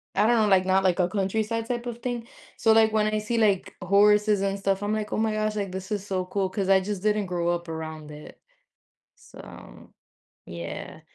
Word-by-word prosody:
I - - +3
don't 240 0 +4
know, - - +2
like 190 -2 +4
not 190 0 +2
like 185 -1 +2
a 175 - +3
countryside 220 +4 -1
type 240 -1 -3
of 240 -1 -6
thing. 240 -2 -4 0.3
So, 225 - +3
like 220 0 +5
when 215 -1 +2
I 215 0 0
see 230 +2 -2
like 205 -4 +1
horses 205 +2 +4
and 195 0 -1
stuff, 195 0 0
I'm 210 +1 -1
like, 210 -1 -3
"Oh - - -1
my 220 0 +1
gosh, 215 0 -1
like 200 -3 -3
this 190 +2 -7
is 205 -1 -2
so 185 -2 -2
cool," 190 0 -1
'cause 195 -1 -2
I 190 0 +6
just 200 -1 -4
didn't 210 -1 +1
grow 175 -1 -1
up 175 0 -2
around 160 -1 -6
it. 150 0 -12 0.8
So, - - -14 0.5
yeah, 85 0 -7
200 Hz, 215 wpm, -25 LUFS, 185-215 Hz, 0.8 s, I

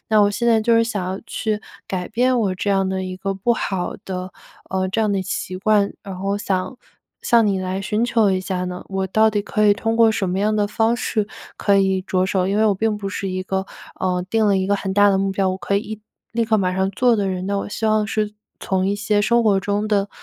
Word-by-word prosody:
那 215 -1 +4
我 205 0 +4
现 235 +3 -2
在 225 -2 +4
就 230 +1 +3
是 230 - +4
想 210 -5 -3
要 190 +2 -4
去 215 -2 -2 0.3
改 180 -2 -3
变 250 +2 +2
我 195 -4 0
这 200 +2 -2
样 195 -1 +2
的 190 0 -2
一 185 0 -5
个 195 +1 -3
不 220 +5 +1
好 190 -5 -2
的， 185 -1 -5 0.4
呃， 190 0 0
这 225 - -1
样 215 -2 +2
的 195 - 0
习 185 0 -4
惯， 205 +1 +2
然 195 -2 -6
后 195 +2 -4
我 200 - 0
想 195 +5 -2 0.5
向 235 -2 +4
你 195 -2 +1
来 185 +1 -3
寻 210 +4 0
求 225 -4 +3
一 185 - +1
下 185 0 -3
呢， 180 0 -6
我 195 0 -2
到 220 +3 +4
底 205 -1 -1
可 210 0 +1
以 205 - +6
通 225 +1 -1
过 225 -1 +5
什 190 -4 -1
么 185 - -1
样 215 +1 +1
的 205 -1 +1
方 225 +2 +1
式 215 -3 -1 0.3
可 200 -1 +2
以 190 -1 +2
着 185 -1 0
手？ 185 -1 0
因 200 +2 0
为 220 - +3
我 205 - +4
并 220 +2 0
不 200 -1 -4
是 195 -1 -4
一 185 0 -3
个， 190 +1 -2 0.3
嗯， 180 -1 0
定 220 -1 +2
了 200 -1 +3
一 190 0 0
个 205 - +3
很 190 -1 -3
大 205 0 +6
的 190 - +2
目 195 0 0
标， 190 -1 +1
我 185 - -2
可 200 - 0
以 - - +1
一 215 0 -7 0.3
立 230 0 +1
刻 220 0 +2
马 185 -2 0
上 190 0 +1
做 240 +2 +3
的 200 -1 0
人， 185 -1 -3
那 200 0 0
我 - - -4
希 220 - -5
望 215 -1 +2
是 210 0 -1 0.3
从 190 -1 0
一 200 - +1
些 210 0 +1
生 235 +3 +3
活 205 -3 +3
中 205 +2 -1
的 200 -1 +1
200 Hz, 285 characters per minute, -21 LUFS, 190-215 Hz, 0.5 s, 以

